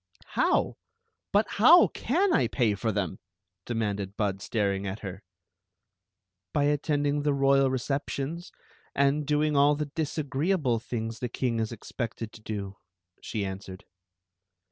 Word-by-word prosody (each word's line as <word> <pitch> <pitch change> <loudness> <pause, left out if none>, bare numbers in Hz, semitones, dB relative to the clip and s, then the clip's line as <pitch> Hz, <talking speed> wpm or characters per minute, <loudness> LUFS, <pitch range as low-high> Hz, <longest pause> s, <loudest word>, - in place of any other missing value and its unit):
•mow? - - +2 0.6
But 205 +2 +3
how 315 - +7
can 355 +8 +1
I - - +3
pay 115 -5 +1
for 105 +3 -1
them? 100 -4 -2 0.2
" 90 -2 -58
demanded 105 -4 -2
Bud, 100 -2 -1
staring 100 -2 -1
at 95 +3 -5
her. 95 -1 -6 0.7
" 95 0 -59
By 145 - +3
attending 145 0 +1
the 145 -1 +1
royal 135 0 +4
receptions, 140 +5 -3 0.4
and 140 +1 +2
doing 150 0 +2
all 145 +1 +5
the 150 -1 -4
disagreeable 150 -3 0
things 115 0 -4
the 125 - -3
king 120 -1 -1
is 110 0 -1
expected 115 0 -5
to 110 - -13
do," 100 -2 -5 0.4
she 105 -2 -3
answered. 95 0 -7
120 Hz, 140 wpm, -28 LUFS, 100-145 Hz, 0.7 s, how